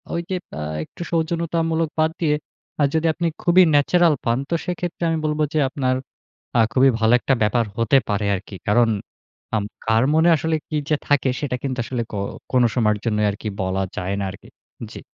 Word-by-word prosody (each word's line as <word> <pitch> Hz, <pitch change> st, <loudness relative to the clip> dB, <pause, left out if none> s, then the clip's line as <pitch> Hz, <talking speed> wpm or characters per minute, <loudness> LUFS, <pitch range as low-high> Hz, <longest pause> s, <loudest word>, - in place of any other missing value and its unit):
ওই 170 Hz, -, 0 dB
যে 190 Hz, -, -1 dB, 0.3 s
আ -, -, -3 dB, 0.2 s
একটু -, -, -13 dB
সৌজন্যতামূলক 165 Hz, -1 st, 0 dB
বাদ 160 Hz, 0 st, +3 dB
দিয়ে 150 Hz, -3 st, +2 dB, 0.5 s
আ -, -, +5 dB
যদি 160 Hz, +1 st, +2 dB
আপনি 170 Hz, +2 st, -1 dB, 0.2 s
খুবই 180 Hz, +1 st, +6 dB
ন্যাচারাল 165 Hz, +2 st, +4 dB
পান, 115 Hz, 0 st, +2 dB
তো 170 Hz, -, +1 dB
সেক্ষেত্রে 175 Hz, -1 st, -4 dB
আমি 165 Hz, -, +1 dB
বলব 150 Hz, 0 st, -1 dB
যে 155 Hz, -, +2 dB
আপনার 130 Hz, -3 st, 0 dB, 0.6 s
আ -, -, +6 dB
খুবই 130 Hz, +3 st, +5 dB
ভালো 110 Hz, +1 st, +3 dB
একটা 135 Hz, -, +2 dB
ব্যাপার 115 Hz, +3 st, +2 dB
হতে 115 Hz, +4 st, +4 dB
পারে 105 Hz, 0 st, 0 dB
আরকি। 95 Hz, +1 st, -7 dB
কারণ 115 Hz, +2 st, +4 dB, 0.7 s
আম 105 Hz, -, 0 dB, 0.2 s
কার 110 Hz, +2 st, +3 dB
মনে 160 Hz, +2 st, +4 dB
আসলে 160 Hz, +1 st, 0 dB
কি 155 Hz, -, -3 dB
যে 155 Hz, -, +4 dB
থাকে, 145 Hz, -2 st, +3 dB
সেটা 135 Hz, -4 st, -2 dB
কিন্তু 130 Hz, -2 st, -3 dB
আসলে 120 Hz, 0 st, -2 dB
ক -, -, -6 dB, 0.4 s
কোন 125 Hz, -1 st, +4 dB
সময়ের 105 Hz, -4 st, +2 dB
জন্যই 105 Hz, -2 st, +1 dB
আরকি 105 Hz, +2 st, -5 dB
বলা 95 Hz, +1 st, -1 dB
যায় 95 Hz, +2 st, -2 dB
না 100 Hz, -, -1 dB
আরকি। 95 Hz, -, -13 dB, 0.4 s
জি। -, -, -8 dB
135 Hz, 190 wpm, -22 LUFS, 110-160 Hz, 0.7 s, খুবই